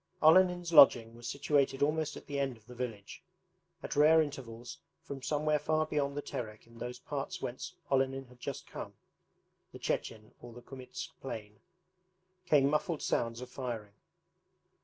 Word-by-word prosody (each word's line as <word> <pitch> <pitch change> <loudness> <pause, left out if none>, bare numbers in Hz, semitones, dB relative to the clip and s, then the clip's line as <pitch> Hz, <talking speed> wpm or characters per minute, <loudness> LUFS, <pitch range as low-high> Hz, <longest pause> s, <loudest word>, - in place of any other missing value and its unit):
Olenin's 175 +1 +5
lodging 120 -6 +8
was 120 0 -9
situated 140 +1 +1
almost 155 +1 0
at - - -11
the 145 -1 -3
end 135 -3 -1
of 110 - -24
the 125 - -11
village. 115 -5 -6 0.6
At - - -4
rare 155 +2 +7
intervals, 125 -6 -4 0.2
from 135 -1 -7
somewhere 150 +3 +1
far 155 +1 +1
beyond 145 -2 -1
the 145 - -2
Terek 110 -3 -6
in 115 0 -16
those 125 0 -5
parts 140 +2 -4
whence 120 - -5 0.2
Olenin 135 0 +1
had 125 0 -18
just - - -5
come - - -8 0.8
(the - - -9
Chechen 110 -1 -3
or 120 -1 -10
the 120 +1 -12
Kumytsk 130 0 -8
plain), 105 -5 -7 0.9
came 140 -3 +5
muffled 155 +2 0
sounds 115 0 0
of 125 0 -8
firing. 115 -6 -5
135 Hz, 160 wpm, -32 LUFS, 120-150 Hz, 0.9 s, lodging